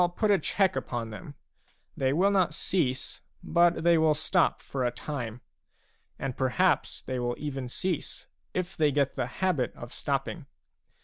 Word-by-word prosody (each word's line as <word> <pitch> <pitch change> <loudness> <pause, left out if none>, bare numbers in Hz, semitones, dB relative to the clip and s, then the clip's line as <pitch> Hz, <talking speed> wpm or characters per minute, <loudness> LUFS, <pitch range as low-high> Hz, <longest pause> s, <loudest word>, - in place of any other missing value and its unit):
put 215 -2 +2
a 200 - +5
check 190 +4 +1
upon 115 -2 -3
them; 145 +7 -9 0.6
they 130 -1 +1
will 185 +8 +3
not 185 -6 +2
cease, 140 -7 -1 0.2
but 170 -1 +3
they 170 -1 +5
will 155 -1 +4
stop 165 +3 +2
for 135 -2 -3
a 120 - +3
time; 120 -2 -5 0.8
and 135 -2 -3
perhaps 130 -3 +1
they 130 -1 -3
will 120 0 -1
even 135 -4 -4
cease, 175 +4 -3 0.3
if 180 -1 -3
they 150 -2 +3
get 140 -1 +1
the 130 -3 -2
habit 150 - 0
of - - -9
stopping. - - -2
145 Hz, 160 wpm, -28 LUFS, 130-175 Hz, 0.8 s, a